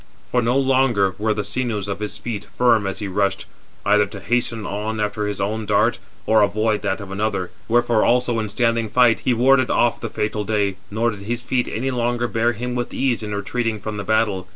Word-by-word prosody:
For 125 - +2
no 120 +3 +1
longer 130 -8 +2
were 110 0 +1
the 105 - -2
sinews 105 -1 -2
of 100 0 -3
his 105 -1 -4
feet 105 -3 -5
firm 115 -5 +4
as 95 - -3
he 105 - -4
rushed, 95 0 0 0.4
either 105 0 +4
to 100 +1 -9
hasten 115 0 -1
on 105 +2 -3
after 105 0 -1
his 105 - -4
own 105 +2 -2
dart, 105 +3 +2 0.3
432 - - -3
or 110 - +6
avoid 105 +1 +1
[that 100 0 -1
of 95 - -10
another]. 100 -2 -2 0.2
Wherefore 120 -1 +3
also 120 -1 +2
in 110 -1 -3
standing 115 0 0
fight, 120 +1 +4
he 125 - +1
warded 130 +2 +4
off 120 -1 +2
the 115 - -3
fatal 105 0 -2
day, 100 -2 0
nor 115 +3 0
did 105 - -8
his 120 +4 -3
feet 125 0 0
any 130 +5 -2
longer 120 -1 0
bear 120 +1 +1
him 125 +3 -4
with 120 -1 -3
ease 130 -4 0
in 105 -1 -4
retreating 110 +2 -2
from 105 +1 -5
the 100 - -3
battle. 105 -3 0
110 Hz, 220 wpm, -21 LUFS, 105-120 Hz, 0.4 s, or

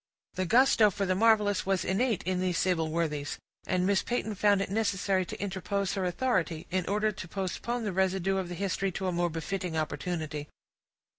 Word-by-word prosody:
The 185 -1 -2
gusto 235 -1 +5
for 200 0 -2
the 185 - +1
marvelous 210 -1 +3
was 190 -2 0
innate 220 +2 +1
in 185 +1 -1
these 180 -2 0
sable 165 -4 +1
worthies; 155 -3 -2 0.3
and 180 0 +1
Miss 200 0 +3
Peyton 235 -3 -2
found 205 0 +3
it 195 - -2
necessary 195 -3 +1
to - - -7
interpose 195 0 -2
her 195 -2 -1
authority, 180 -5 0
in 185 -1 0
order 210 +2 +1
to 190 -4 -8
postpone 200 +6 -3
the 205 -3 -2
residue 190 0 +1
of 185 -2 -2
the 175 - -5
history 195 +1 -1
to 190 - -3
a 185 - +1
more 175 0 +1
befitting 170 +1 -3
opportunity. 155 -1 -3
190 Hz, 190 wpm, -29 LUFS, 175-200 Hz, 0.3 s, gusto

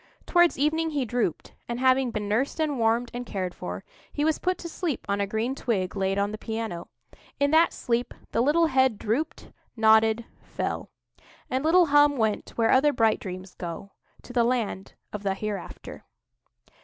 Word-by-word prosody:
Towards 345 -1 +4
evening 320 +3 +1
he 285 -4 -1
drooped; 235 -8 -2
and, 235 0 -3
having 260 0 +3
been 210 -3 -3
nursed 240 +10 0
and 295 -4 0
warmed 230 +1 +1
and 245 +1 -4
cared 185 -6 -4
for, 90 +1 -6 0.3
he 295 - -1
was 315 -1 +1
put 365 0 0
to 340 - -7
sleep 330 -4 -3
on 200 0 0
a 200 - 0
green 220 +5 -1
twig 210 -9 -2
laid 195 0 0
on 200 +1 0
the 215 - -6
piano. 220 -6 -4 0.5
In 285 0 +2
that 325 +2 +5
sleep 240 0 -2 0.2
the 230 - +1
little 305 +6 +4
head 260 -6 +2
drooped—nodded—fell; 220 -2 0 0.6
and 260 +2 0
little 345 +3 +5
Hum 290 -1 +4
went 220 -3 0
where 225 -1 +3
other 290 +3 +5
bright 225 -3 +2
dreams 185 -1 -7
go—to 190 +7 -10
the 240 -2 +3
Land 230 -5 -2 0.2
of 210 - -4
the 195 -1 -1
Hereafter. 210 0 -6
235 Hz, 165 wpm, -26 LUFS, 210-285 Hz, 0.6 s, that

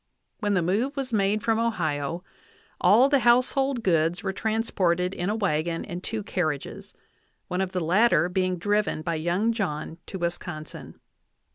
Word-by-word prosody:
When 205 -3 0
the 180 - +2
move 230 - 0
was 265 -3 -3
made 205 0 +1
from 225 -1 +1
Ohio, 170 -7 -1 0.6
all 220 +9 +6
the 280 -1 +3
household 255 +1 +2
goods 165 -1 +1
were 190 -1 -2
transported 190 -5 0
in 180 +1 -2
a 210 - 0
wagon 165 -5 -1
and 175 +1 -6
two 220 -2 -3
carriages, 155 -8 -3 0.5
one 180 +1 -1
of 190 -1 -2
the 185 -1 -2
latter 175 0 +3
being 185 0 0
driven 205 -3 0
by 170 - -1
young 175 +8 0
John 165 -6 -3
to 190 - -5
Wisconsin. 170 -3 -6
190 Hz, 155 wpm, -26 LUFS, 170-220 Hz, 0.6 s, all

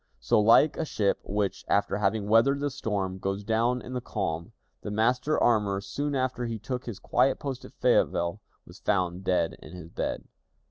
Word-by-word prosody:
So, - - +2
like 115 +8 +5
a - - 0
ship 105 -9 0
which, 100 0 -2
after 100 0 +1
having 105 0 0
weathered 115 +6 +4
the 145 0 -1
storm, 100 -8 -3
goes 95 +1 -2
down 115 +3 +1
in 125 - -8
the 125 - -2
calm, 85 -8 -3 0.3
the - - -5
master 125 +8 +1
armorer, 105 -4 +2
soon 145 +8 -3
after 130 -2 -1
he 115 -1 -3
took 125 +4 -5
his 115 -5 -5
quiet 130 +5 +2
post 135 -3 -5
at - - -13
Fayetteville, 85 +4 +1 0.2
was 90 - -14
"found 90 -2 0
dead 90 -3 0
in 75 - -12
his 85 -3 -9
bed." - - -3
105 Hz, 185 wpm, -27 LUFS, 95-125 Hz, 0.3 s, like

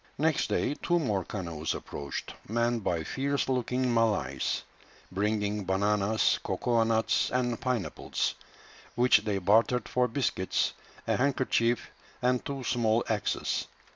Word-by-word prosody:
Next 155 0 +2
day - - +1
two 175 - +2
more 105 - 0
canoes 85 -5 -4
approached, 70 -1 -6
manned 115 0 0
by 85 -3 0
fierce 140 - -1
looking 125 -1 0
Malays, 115 -2 +1 0.5
bringing 105 +1 0
bananas, 100 +3 +2
cocoa 120 -2 +1
nuts, 110 0 +2
and 125 -2 -1
pineapples, 125 -7 -1 0.6
which 125 +2 +5
they 105 -2 -1
bartered 110 +5 +3
for 125 0 +2
biscuits, 115 -6 0 0.3
a - - +1
handkerchief, 125 -3 +1 0.3
and 125 0 +1
two 140 -2 -4
small 115 -2 +2
axes. 105 -2 -1
115 Hz, 120 wpm, -29 LUFS, 105-125 Hz, 0.6 s, which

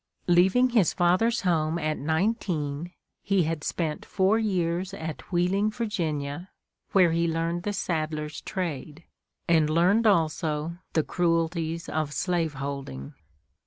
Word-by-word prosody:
Leaving 190 +9 +4
his 220 -8 +3
father's 185 +7 +2
home 165 -3 +1
at 155 -2 -1
nineteen, 160 -2 -1 0.3
he 195 -3 +2
had 160 -1 -2
spent 160 -3 -2
four 195 +4 +2
years 185 -2 -1
at 160 -2 -7
Wheeling, 185 +4 +2
Va., 175 -7 -3 0.4
where 185 -4 +5
he 170 +1 +1
learned 165 +1 -1
the 205 - -2
saddler's 155 -5 -3
trade, 165 -3 -5 0.4
and 160 -3 +4
learned 185 +8 +3
also 160 -3 +1 0.2
the 160 - +2
cruelties 165 -1 -1
of 155 -1 -2
slave 170 -4 -1
holding. 135 - -6
170 Hz, 125 wpm, -26 LUFS, 155-185 Hz, 0.4 s, where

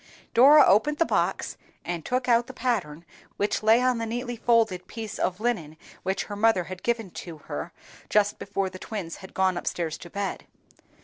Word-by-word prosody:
Dora 280 +5 +8
opened 260 +10 +3
the 330 - +3
box, - - -1 0.3
and 175 -2 -3
took 250 +6 -1
out 235 -1 +3
the 260 - -10
pattern 175 -12 -2 0.3
which 205 - 0
lay 220 +3 +5
on 255 -2 +2
the 230 - -2
neatly 245 +2 -3
folded 220 -6 +2
piece 220 -2 -7
of 185 +1 -1
linen 200 -10 -2 0.2
which 190 +1 -1
her 205 - -7
mother 210 -3 +3
had 185 +1 -8
given 230 -5 -1
to 170 -2 -8
her 75 - -6 0.4
just 205 -1 +2
before 195 -1 -2
the 185 - -9
twins 190 -7 -5
had 190 -1 -13
gone 190 -1 +2
up - - -10
stairs 165 -2 -2
to 175 - -10
bed. 200 +1 -4
205 Hz, 190 wpm, -26 LUFS, 180-235 Hz, 0.4 s, Dora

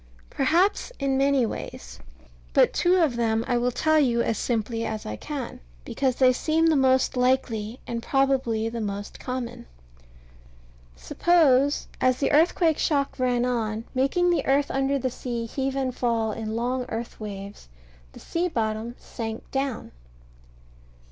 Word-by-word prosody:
Perhaps 345 - +2
in 275 -1 0
many 275 -2 +3
ways. - - -7 0.5
But - - +4
two 355 +1 +3
of 320 -9 +2
them 225 -1 +1
I 245 -2 +1
will 245 +1 +1
tell 315 +5 +2
you 235 -5 +2
as 230 - -1
simply 230 -1 -1
as 220 -1 -4
I 105 - -4
can, 270 - -6 0.3
because 260 -3 0
they 255 -1 +5
seem 320 +5 +1
the 325 -1 +4
most 260 -1 +3
likely, 250 -3 0
and 235 -1 -4
probably 260 -5 +1
the 230 0 -4
most 205 -1 -5
common. 255 - -5 1.3
Suppose, 280 - +3 0.2
as 255 -1 +3
the 275 - 0
earthquake 320 +1 +3
shock 280 -3 0
ran 250 -1 +1
on, 225 -3 -1
making 315 +7 +2
the 345 - +1
earth 280 +1 +2
under 270 +1 +1
the 255 -1 -2
sea 240 -2 -4
heave 270 +3 -3
and 260 -2 -1
fall 230 -3 0
in 220 0 -4
long 250 +2 -1
earth 230 +1 -5
waves, 200 - -8 0.4
the - - -12
sea 345 +2 -2
bottom 225 -4 -2
sank 225 -2 -7
down. 270 -3 -3
255 Hz, 150 wpm, -25 LUFS, 230-275 Hz, 1.3 s, they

